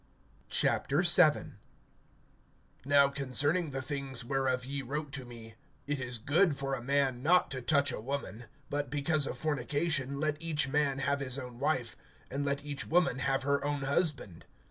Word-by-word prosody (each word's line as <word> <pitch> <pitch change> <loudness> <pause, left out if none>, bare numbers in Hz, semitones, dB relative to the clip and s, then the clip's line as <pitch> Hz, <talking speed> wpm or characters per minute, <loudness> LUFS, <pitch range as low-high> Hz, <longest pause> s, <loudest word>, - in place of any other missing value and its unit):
VII. 170 +1 +3 1.3
NOW 140 0 +5
concerning 140 +5 0
the 135 -1 -4
things 135 -4 -4
whereof 130 -1 0
ye 140 +1 -3
wrote 145 +3 -4
to 135 -3 -4
me: 115 -2 -11 0.3
It 145 -1 -1
is 125 -2 -3
good 145 - +2
for 135 0 -2
a 130 - -2
man 135 -1 0
not 175 +4 +4
to 130 -2 -3
touch 140 +3 +3
a - - -5
woman; 125 -3 -5 0.3
(2)but 145 -1 -2
because 145 +1 0
of - - -5
fornication, 145 -1 -1
let 155 0 -1
each 155 -4 0
man 140 -1 +1
have 140 +1 0
his 130 -1 -4
own 125 -3 -8
wife, 140 -5 -1 0.4
and 140 +2 -2
let 140 0 -2
each 145 -1 -4
woman 175 -3 +2
have 135 0 0
her 140 +1 +1
own 145 -1 -1
husband. 140 - 0
140 Hz, 165 wpm, -31 LUFS, 130-145 Hz, 1.3 s, NOW